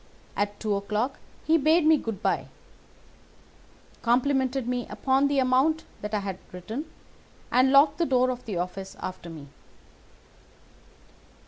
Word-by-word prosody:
At 205 0 -2
two 215 -2 -1
o'clock 210 +6 -2 0.3
he 325 +1 +4
bade 310 +3 +4
me 315 0 +7
good 225 -8 -5
day, - - 0 1.5
complimented 260 +1 +1
me 245 -1 -2
upon 270 +1 +1
the 280 0 0
amount 270 +5 +3 0.2
that 210 +1 -3
I 205 - 0
had 195 -2 -5
written, 220 - -6 0.6
and 255 +2 +4
locked 285 +2 +5
the 340 - +2
door 255 -1 +3
of 250 0 -7
the 205 -6 -3
office 185 +2 -5
after 180 -2 -6
me. 150 -4 -10
250 Hz, 135 wpm, -26 LUFS, 205-280 Hz, 1.5 s, me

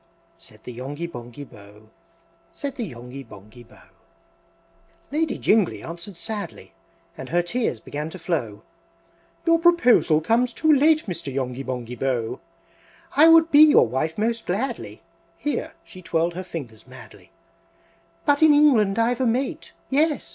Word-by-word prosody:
Said 110 0 -15
the 125 - -8
Yonghy 140 +7 -6
Bonghy 120 -3 -9
Bò, 105 -2 -17 0.7
Said 280 -2 -6
the 240 - -4
Yonghy 125 +2 -10
Bonghy 110 +1 -15
Bò. 115 - -20 1.3
V. - - -6
Lady 320 -1 0
Jingly 210 -4 +1
answered 170 +2 -8
sadly, 215 0 -7 0.4
And 130 - -9
her 175 +2 +1
tears 220 - -2
began 150 +7 -6
to 185 - -9
flow, 120 - -3 0.8
"Your 330 -1 +4
proposal 290 - +4
comes 235 +9 +1
too 315 -1 +3
late, 310 +2 +3
Mr. 175 -8 -5
Yonghy 130 -1 -3
Bonghy 125 -2 -5
Bò! 125 -2 -2 0.8
I 310 +3 +7
would 330 0 +6
be 290 - +6
your 305 - +7
wife 145 +7 -2
most 225 +1 -2
gladly!" 235 +7 -4 0.3
(Here 295 - -3
she 185 - -13
twirled 170 0 -1
her 185 +2 -6
fingers 125 - -9
madly,) 130 - -15 1.0
"But 290 0 +2
in 310 -2 +6
England 235 -9 +4
I've 235 +2 +1
a 255 - +2
mate! 250 +4 -2 0.2
Yes! 295 0 +1
175 Hz, 145 wpm, -23 LUFS, -, 1.3 s, I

